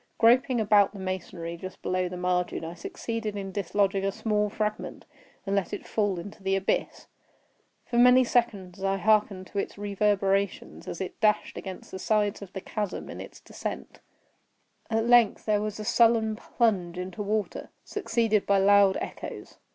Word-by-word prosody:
Groping 245 +2 +4
about 205 -2 +4
the 200 - -9
masonry 185 -2 -4
just 185 +2 -8
below 185 0 0
the 180 - -6
margin, 180 -2 -1
I 165 - -6
succeeded 230 - -5
in 195 -1 -5
dislodging 195 0 0
a 195 - +1
small 210 0 0
fragment, 215 0 -3 0.4
and 195 0 0
let 200 -2 -1
it - - -5
fall 205 -4 0
into 200 +4 -9
the 195 0 +1
abyss. 195 0 -1 0.8
For 235 - 0
many 250 +1 +7
seconds 200 -7 -1
I 195 0 +1
hearkened 205 -1 +2
to 200 - -2
its - - -4
reverberations 200 -1 0
as 175 - -5
it 190 - -5
dashed 210 -1 +2
against 190 -2 -8
the 190 - -6
sides 210 0 +1
of 195 -3 -9
the 190 - -5
chasm 210 -1 -4
in - - -7
its - - -11
descent; - - -7 0.9
at 225 0 +1
length 240 -3 +4
there 210 -1 +2
was 215 0 -4
a 215 - -5
sullen 225 -1 +3
plunge 195 -7 0
into 180 +2 -5
water, 205 -2 -2
succeeded 230 - 0
by 200 - +4
loud 200 0 +5
echoes. - - -7
200 Hz, 165 wpm, -27 LUFS, 190-220 Hz, 0.9 s, many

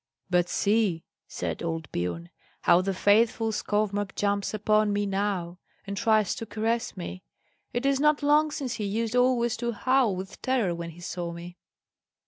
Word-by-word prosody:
"But 175 0 +3
see," 200 -5 +1 0.2
said - - -4
old 165 -2 -3
Biorn, 85 -1 -3 0.3
"how 175 - +5
the 195 +1 -1
faithful 220 +3 +3
Skovmark 205 -1 -1
jumps 200 -1 0
upon 215 0 +2
me 205 0 0
now, 195 -3 -2 0.3
and 200 - -4
tries 215 -2 +2
to 225 - -6
caress 225 +1 -1
me. 185 +1 -6 0.5
It 245 +2 -2
is 275 -1 +2
not 300 0 +3
long 300 +2 +4
since 280 -5 -3
he 220 -3 -3
used 225 +3 -1
always 245 -2 +3
to 235 0 -2
howl 255 -2 +2
with 185 +1 -8
terror 245 -9 +1
when 170 0 -5
he 170 +1 -12
saw 175 0 -4
me." 175 +1 -9
205 Hz, 165 wpm, -27 LUFS, 180-235 Hz, 0.5 s, how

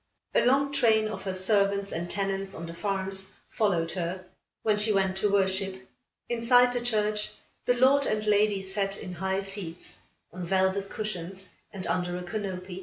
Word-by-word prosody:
A - - +4
long 275 +3 +3
train 220 -5 +3
of 210 -3 -6
her 190 - -1
servants, 200 +1 +2
and 170 +1 -3
tenants 195 0 -2
on 165 - -6
the 165 - -7
farms 190 +1 -2
followed 175 -7 +1
her, 185 +1 -3 0.4
when 210 -1 +2
she 215 +1 +2
went 190 -2 +2
to 200 +1 +1
worship. 190 -1 0 0.4
Inside 245 +1 +4
the 245 - -1
church, 215 -3 0 0.3
the 245 - +3
lord 270 +3 +4
and 215 0 0
lady 205 -1 +3
sat, 195 +1 -1
in 180 - -7
high 190 +2 -1
seats, 195 -4 -5 0.3
on 180 0 -6
velvet 190 +2 +1
cushions 190 -2 -5 0.2
and 190 -2 -6
under 180 -1 -1
a 180 - -5
canopy. 185 -1 -5
195 Hz, 170 wpm, -28 LUFS, 190-215 Hz, 0.4 s, A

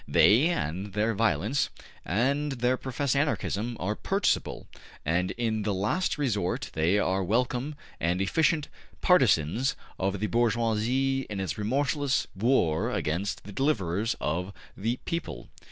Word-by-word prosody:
They, 120 +10 +5
and 95 - -2
their 105 +2 +1
violence, 110 - +1 0.3
and 135 - 0
their 125 0 +1
professed 130 +1 -2
Anarchism 120 -5 -1
are 100 +4 -1
purchasable, 195 - 0 0.4
and 90 +4 +1
in 110 -2 0
the 105 -1 -1
last 105 - 0
resort 105 -11 -1
they 80 +6 +2
are 95 -1 +1
welcome 125 +8 0 0.2
and 85 +2 0
efficient 150 - +2 0.3
partisans 125 - +3 0.2
of 95 +1 -1
the 105 - 0
bourgeoisie 120 +4 +1
in 105 -2 -4
its 95 -7 -2
remorseless 135 +5 0
war 95 -7 +2
against 90 +7 -2
the 100 - -9
deliverers 110 - 0
of 90 +6 -2 0.2
the 115 +5 -1
people.'' 155 - -4
110 Hz, 130 wpm, -28 LUFS, 95-135 Hz, 0.4 s, They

